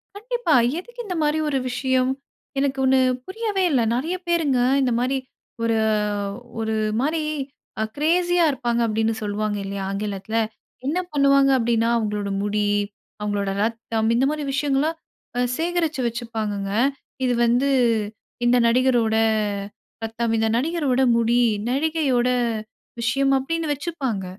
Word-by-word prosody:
கண்டிப்பா. 470 -4 -1 0.3
எதுக்கு 480 +5 -13
இந்த 365 - -3
மாரி 300 +1 +1
ஒரு 275 - +1
விஷயம்? 255 0 +1 0.5
எனக்கு 270 -1 0
ஒண்ணு 260 0 +4 0.3
புரியவே 410 -1 -1
இல்ல. 260 -4 +3
நெறைய 310 +9 -1
பேருங்க 320 -7 +2 0.2
இந்த 255 -2 +2
மாரி 260 +2 +1 0.5
ஒரு 230 -1 +2 0.8
ஒரு 220 0 -1 0.3
மாரி 310 +4 0 0.6
அ - - +2
கிரேஸி 350 +4 +2
யா 345 - +5
இருப்பாங்க.அப்டின்னு 235 -4 0
சொல்லுவாங்க 210 0 -1
இல்லயா? 195 0 -4
ஆங்கிலத்ல 200 +1 -4 0.5
என்ன 320 +6 0
பண்ணுவாங்க 275 -1 +4
அப்டின்னா 230 -1 +1
அவங்களோட 210 -3 -1
முடி, 205 0 0 0.5
அவங்களோட 205 -1 -1
ரத்தம் 225 0 -1
இந்த 255 +3 +3
மாரி 305 -1 -2
விஷயங்கள்லாம் 290 +3 +1 0.4
அ - - +2 0.2
சேகரிச்சு 330 -4 0
வச்சுப்பாங்கங்க. 220 -4 -3 0.5
இது 250 - +2
வந்து 245 +4 +2 0.8
இந்த 245 +1 +5
நடிகரோட 240 -2 +3 0.9
ரத்தம். 225 +1 -1
இந்த 225 - +2
நடிகரோட 280 -2 +1 0.2
முடி. 235 +1 +3 0.3
நடிகையோட 275 -3 +1 0.7
விஷயம். 270 +4 +2
அப்டின்னு 320 +3 -2
வச்சுப்பாங்க. 270 - -3
255 Hz, 120 wpm, -23 LUFS, 225-300 Hz, 0.9 s, யா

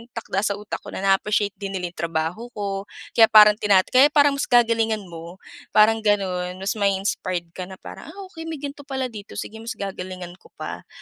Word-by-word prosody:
takda 225 -4 -2
sa 200 - -1
utak 210 +1 -6
ko - - -16
na - - -5
na-appreciate 200 +1 +2
din 195 -1 -5
nila 180 -2 -3
yung 170 - -17
trabaho 165 +7 -2
ko, 200 -1 -4 0.2
kaya 225 -1 +6
parang 210 -1 +7
tina 195 -3 +4
kaya 260 +7 +5
parang 290 -2 +3
mas - - -1
gagalingan 225 -3 +3
mo, 170 -1 -10 0.4
parang 220 +1 +6
gano'n. 185 -4 0
Mas 195 +2 -3
mai-inspired 190 -3 -1
ka 180 +1 -7
na 190 - -9
parang, - - -11
"Ah! 320 - -11 0.2
okey 325 -1 -8
may 325 - -4
ganito 285 0 -8
pala 265 -2 -3
dito, 205 -2 -10
sige 220 - -6
mas 230 +2 -6
gagalingan 185 -2 -6
ko - - -19
pa." - - -7
205 Hz, 200 wpm, -23 LUFS, 185-230 Hz, 0.4 s, parang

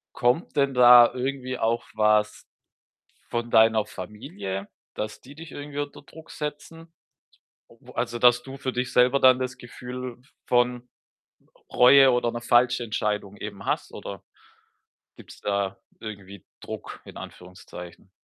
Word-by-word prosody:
Kommt 125 +8 0
denn 140 -2 +2
da 120 -1 +8
irgendwie 130 0 -3
auch 115 +1 0
was 105 0 +1 0.8
von 120 0 -3
deiner 110 -1 +4
Familie, 100 -1 -7 0.3
dass 105 0 -5
die 140 +3 -14
dich 165 +1 -11
irgendwie 145 0 -7
unter 145 0 -5
Druck 160 +2 -15
setzen? 160 +2 -7 0.8
O - - -17
also, 120 0 -2
dass 125 0 +5
du 135 0 -9
für 130 -1 -4
dich 125 0 -3
selber 125 +2 +4
dann 130 0 +6
das 130 0 -4
Gefühl 125 0 -8
v - - -27 0.2
von 125 0 +1 0.7
R - - -28
Reue 135 +2 +7
oder 120 -1 0
'ne 120 - -5
falsche 120 +1 +3
Entscheidung 105 -2 -3
eben 100 -2 -8
hast - - -2
oder - - -8 1.0
gibt's - - -14
da 100 -1 -1 0.2
irgendwie 100 -3 -10 0.2
Druck - - -8
in - - -11
Anführungszeichen? 90 0 -11
120 Hz, 140 wpm, -25 LUFS, 105-130 Hz, 1.0 s, da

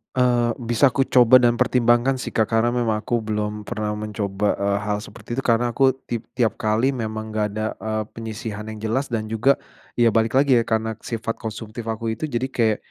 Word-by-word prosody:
Eee, 120 -2 +3 0.2
bisa 125 +3 +4
aku 135 +2 +1
coba 125 0 +7
dan 120 -1 +3
pertimbangkan 125 +1 +2
sih, - - -6
Kak. 110 - +4
Karena 115 +1 +3
memang 120 -3 0
aku 115 +1 -1
belum 105 0 -3
pernah 105 0 -3
mencoba, 105 -1 -2
eee, 100 0 +1
hal 105 0 -1
seperti 115 +4 -7
itu. - - -3
Karena 120 +1 +2
aku 135 +1 +3
tip 120 -2 -5
tiap 120 -4 0
kali 110 +5 +2
memang 110 -3 -4
nggak 110 -1 0
ada, 110 - -2 0.2
eee, 110 0 -2
penyisihan 110 -1 -6
yang 110 - -6
jelas 125 +5 0
dan 115 -3 -2
juga, 125 +5 +3 0.4
ya 120 -1 +4
balik 115 +2 +1
lagi 135 -2 +5
ya, - - +1
karena 110 -1 -1
sifat 115 -1 -4
konsumtif 110 +1 -6
aku 115 0 -2
itu. 135 +8 -3
Jadi 130 -1 -2
kayak, 110 -4 +2
115 Hz, 200 wpm, -22 LUFS, 110-120 Hz, 0.4 s, coba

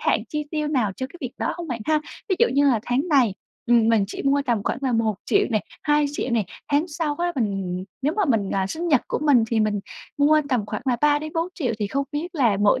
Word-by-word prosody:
hạn - - +2
chi 300 -1 -3
tiêu 305 -2 -1
nào 240 -9 +1
cho 260 - -3
cái 320 - -14
việc 255 -2 -5
đó - - -1
hông 340 -2 -6
bạn 235 -3 -3
ha? 310 -1 +3 0.3
Ví 375 - +1
dụ 475 - +5
như 285 0 +4
là 225 -4 +1
"tháng 270 +8 0
này, 255 -10 +3 0.3
ừm, 230 -1 +4
mình 220 -3 +4
chỉ - - -6
mua 280 +1 +2
tầm 230 -4 +1
khoảng - - -1
là 260 -2 0
1 225 -2 +1
triệu 400 0 +3
nè, 215 -2 +2 0.2
2 295 -1 +3
triệu 260 - -3
nè, 225 -4 +1 0.3
tháng 305 +5 +2
sau 300 -2 -2
á, 350 0 0
mình 195 -5 -2 0.2
nếu 295 +3 +1
mà 410 - +3
mình, 220 - +1
à, 190 -1 0
sinh 335 - -3
nhật 285 -6 +4
của - - -1
mình 280 -7 +4
thì 225 -2 +2
mình 210 -2 +1 0.4
mua 305 +2 +5
tầm 240 -6 0
khoảng 210 0 -4
là 245 -2 +2
3 295 0 +4
đến 310 +1 -7
4 330 +2 0
triệu", 250 -9 -1
thì 205 - -1
không 275 +7 -1
biết 330 +4 -4
là 235 -9 +3
mỗi 210 +5 +4
265 Hz, 265 wpm, -23 LUFS, 220-300 Hz, 0.4 s, dụ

